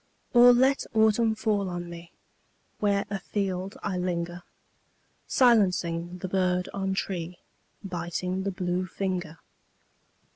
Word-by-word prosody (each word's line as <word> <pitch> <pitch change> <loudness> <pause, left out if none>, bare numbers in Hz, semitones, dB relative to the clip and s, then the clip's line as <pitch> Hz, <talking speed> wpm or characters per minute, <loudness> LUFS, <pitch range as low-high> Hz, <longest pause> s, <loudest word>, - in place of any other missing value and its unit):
Or 245 0 +9
let 260 +3 +3
autumn 220 +1 +3
fall 210 -3 0
on 175 0 -5
me 170 0 -10 0.7
Where 200 -1 +1
afield 195 -1 -3
I 185 -3 -2
linger, 175 -1 -3 0.9
Silencing 180 -8 +2
the 185 - -5
bird 180 -1 +1
on 195 -1 -2
tree, 180 -2 -3 0.5
Biting 180 0 -3
the 200 - -1
blue 185 -1 -2
finger. 180 -4 -3
185 Hz, 110 wpm, -27 LUFS, 175-200 Hz, 0.9 s, Or